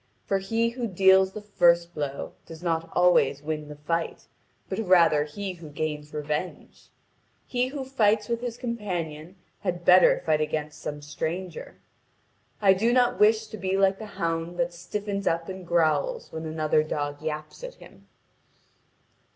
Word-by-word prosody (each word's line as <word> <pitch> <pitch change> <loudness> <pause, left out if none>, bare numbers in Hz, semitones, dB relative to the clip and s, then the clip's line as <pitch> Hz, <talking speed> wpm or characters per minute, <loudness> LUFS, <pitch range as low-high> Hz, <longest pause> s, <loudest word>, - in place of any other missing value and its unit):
For 195 - +1
he 225 +4 0
who 240 0 -3
deals 190 0 +4
the 215 - -7
first 175 -4 +3
blow 140 -2 -4
does 165 +1 -10
not 165 -1 -1
always 160 -6 +3
win 155 -1 -3
the 150 - -9
fight, 165 +3 -3 0.4
but - - -3
rather 170 -7 +4
he 190 +5 -5
who 165 -3 -11
gains 150 0 -4
revenge. 150 +3 -5 0.6
He 250 0 0
who 270 0 -5
fights 220 -5 +2
with 235 0 -2
his 240 -1 -4
companion 180 - -4 0.2
had 175 -2 -3
better 180 0 +6
fight 155 -1 +2
against 150 0 -3
some 150 -1 -5
stranger. 165 +4 -5 0.9
I 195 -1 +7
do 220 +5 +2
not 245 0 +3
wish 220 +1 +5
to 215 0 -9
be 190 0 -1
like 195 0 +3
the 220 - -7
hound 165 +1 -2
that 175 0 0
stiffens 200 +3 -4
up 165 +1 0
and 185 -2 -7
growls 175 - +1
when 160 0 -5
another 155 -1 +1
dog 145 -1 -3
yaps 155 - -5
at - - -7
him." - - -17
175 Hz, 160 wpm, -26 LUFS, 155-205 Hz, 0.9 s, I